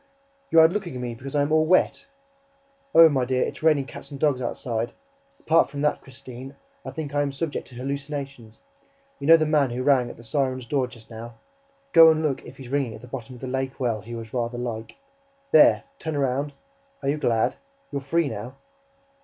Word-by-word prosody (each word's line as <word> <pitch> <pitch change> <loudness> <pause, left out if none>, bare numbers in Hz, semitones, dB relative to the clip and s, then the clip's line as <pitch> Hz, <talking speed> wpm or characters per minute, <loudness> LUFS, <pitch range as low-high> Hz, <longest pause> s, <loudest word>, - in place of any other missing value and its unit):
YOU'RE 160 0 +7
LOOKING 180 -5 -4
AT - - -4
ME 120 -1 -4
BECAUSE 135 +4 -8
I 145 - +3
AM 145 - -2
ALL 155 0 +3
WET?... 185 +9 +2 0.9
Oh, 165 0 +10
my 135 -4 +1
dear, 130 0 +1
it's - - -7
raining 155 -4 +3
cats 140 - -10
and 140 -2 -8
dogs 140 -4 +2
outside!... 120 -1 -3 0.5
Apart 165 +1 +3
from 145 0 -5
that, 150 - +1
Christine, 130 +1 -11 0.3
I - - -6
think 150 -3 -6
I 145 - +2
am 145 -1 -1
subject 145 +2 -4
to 125 - -14
hallucinations... 140 -3 -5 0.6
You 140 - -4
know, 165 +1 +9
the 155 - +1
man 150 -3 +2
who 125 +2 -3
rang 130 -3 +3
at - - -10
the 115 - -13
siren's 130 +1 -1
door 130 +1 0
just 115 -3 -15
now 115 +1 -9 0.6
go 165 -1 +9
and 160 0 +2
look 145 -4 -1
if - - -12
he's 130 -3 -10
ringing 135 -5 -1
at 110 - -12
the - - -10
bottom 125 -1 -7
of 120 - -14
the - - -5
lake 130 +1 -3
well, 115 -5 -1
he 120 +3 -8
was 115 -1 -8
rather 120 -1 -2
like... 115 -2 -5 0.6
There, 300 0 +6 0.2
turn 160 -2 -3
round... 140 +1 -1 0.5
are 135 - 0
you 145 - +1
glad? 115 -6 +1 0.3
You're 140 -1 -3
free 165 +4 +1
now... 115 +2 -6
135 Hz, 210 wpm, -25 LUFS, 120-150 Hz, 0.9 s, Oh